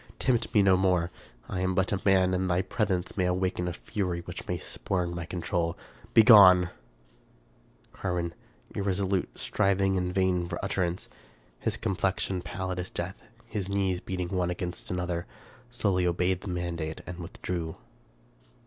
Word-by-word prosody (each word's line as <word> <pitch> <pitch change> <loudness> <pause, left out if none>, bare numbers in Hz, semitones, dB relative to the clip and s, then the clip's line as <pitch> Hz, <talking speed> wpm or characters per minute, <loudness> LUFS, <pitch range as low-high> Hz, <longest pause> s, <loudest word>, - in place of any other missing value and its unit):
Tempt 120 -3 +1
me 105 - +6
no 95 -1 +6
more. 90 -2 +2 0.4
I 90 - -3
am 95 0 0
but 95 -1 +1
a 100 -2 0
man, 95 -2 +4
and 90 0 0
thy 90 +1 +2
presence 95 -2 -1
may 95 -3 +1
awaken 90 -1 0
a 90 - -2
fury 90 -1 -3
which - - -8
may - - -1
spurn 90 -2 -2
my 85 -1 -4
control. 85 -1 -2 0.4
Begone! 100 -6 +8 0.6
" - - -33
Carwin, 90 -3 -2 0.4
irresolute, 95 -1 0
striving 95 -1 +1
in 90 -1 0
vain 90 -2 +1
for 85 - -3
utterance, 90 -2 -1 0.5
his - - -1
complexion 95 -1 -1
pallid 95 0 -4
as 90 - -3
death, - - -5 0.2
his 100 -2 -4
knees 95 -2 +1
beating 90 -1 -4
one 90 -2 0
against 90 0 -4
another, 90 0 -2 0.4
slowly 100 -7 +1
obeyed 90 +1 +1
the - - -9
mandate 85 -3 -3
and 90 0 -7
withdrew. 85 -1 -4
90 Hz, 150 wpm, -28 LUFS, 90-95 Hz, 0.6 s, Begone